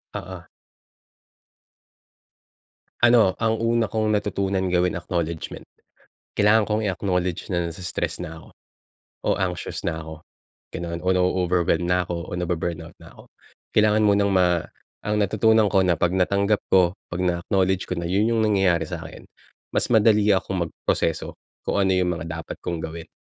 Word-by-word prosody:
Oo. 95 0 -6 2.6
Ano, 120 -5 +6
ang 110 -1 +1
una 115 -1 +2
kong 110 0 0
natutunan 100 -2 0
gawin, 90 -1 +1
acknowledgement. 85 -2 -4 0.7
Kailangan 105 +1 +4
kong 110 +1 -1
i-acknowledge 90 -1 -2
na 85 -1 0
nai-stress 90 +2 -4
na 80 0 -8
ako - - -16 0.8
o - - -1
anxious 90 -2 -3
na 80 - -1
ako, 80 0 -8 0.6
ganoon 85 0 -4
o 90 - -3
na-overwhelm 90 -1 +1
na 90 0 +2
ako 85 -1 -5
o - - -8
nabu-burnout 85 -1 -3
na - - -13
ako. - - -14 0.5
Kailangan 105 0 +4
munang 100 -1 +3
ma 90 -2 +3 0.4
ang 105 0 0
natutunan 110 +1 +3
ko 95 - +4
na 90 -2 +2
'pag 90 +2 +1
natanggap 100 +3 +2
ko, 90 -2 +5 0.2
'pag 90 +1 -4
na-acknowledge 95 +1 0
ko 90 - -2
na, 85 - -3
yun 100 +4 +2
yung 110 -1 +2
nangyayari 95 -5 +2
sa - - -5
akin. - - -11 0.5
Mas - - 0
madali 105 -2 +4
akong 90 -3 -2
magproseso 80 0 -2 0.3
kung - - 0
ano 95 -1 +3
yung 90 -1 +1
mga 85 -1 -5 0.2
dapat - - -7
kong 85 - -2
gawin. 80 +1 -7
95 Hz, 150 wpm, -23 LUFS, 85-105 Hz, 2.6 s, Ano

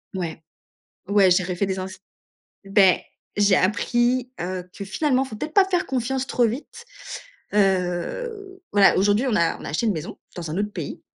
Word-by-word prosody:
Ouais, 165 -3 -4 0.7
ouais, 200 -2 +5
j'ai 180 0 +3
refait 180 +2 -1
des 190 0 -2
ens 185 - -3 0.8
beh 195 -2 +4 0.4
j'ai 200 -2 +5
appris, 240 +6 +1
heu, 180 +1 -4
que 200 - -8
finalement, 265 +4 +1
faut 225 -5 -8
peut-être 305 +7 -5
pas 390 -1 +6
faire 360 -2 +1
confiance 265 +1 -1
trop 245 -2 +2
vite. 295 - -6 0.7
Heu, 210 - -1
voilà, 200 -1 +6
aujourd'hui, 205 +6 +3
on 220 - +1
a 165 -1 +1
on - - -10
a - - -5
acheté 225 +10 -1
une 215 - +3
maison 160 -2 -6 0.2
dans 165 -3 -5
un 160 - -3
autre 205 0 -2
pays. - - -6
205 Hz, 175 wpm, -23 LUFS, 185-255 Hz, 0.8 s, pas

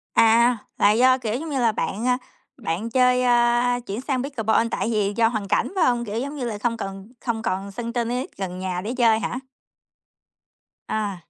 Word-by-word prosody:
À, 235 +2 +5 0.2
là 205 - +5
do, 255 +4 +5
kiểu 225 -4 -3
giống 315 +6 -4
như 275 -3 -1
là, 230 -3 +3
bạn, 215 +3 -2
a, 250 - +3 0.4
bạn 215 0 -3
chơi, 250 +1 +3
ơ, 240 0 +3
chuyển 210 +2 -4
sang 260 -2 -1
pickleball 230 -4 +1
tại 200 +4 -1
vì 205 -2 +1
do 230 -1 +5
hoàn 215 -3 -3
cảnh 195 - +1
phải 370 - +3
hông, 240 -1 +1
kiểu 215 +1 -3
giống 280 +4 -4
như 265 -4 -3
là, 220 -3 -3
không 230 +2 -1
cần 195 0 -7
không 230 -3 -1
còn 195 -1 -2
sân 235 +3 -5
tennis 245 +2 -1
gần 185 -2 -4
nhà 185 -1 -3
để 215 +5 -4
chơi 225 -3 +4
hả? 245 - -3 1.5
Ờ. 210 -2 -2
230 Hz, 200 wpm, -23 LUFS, 210-250 Hz, 1.5 s, À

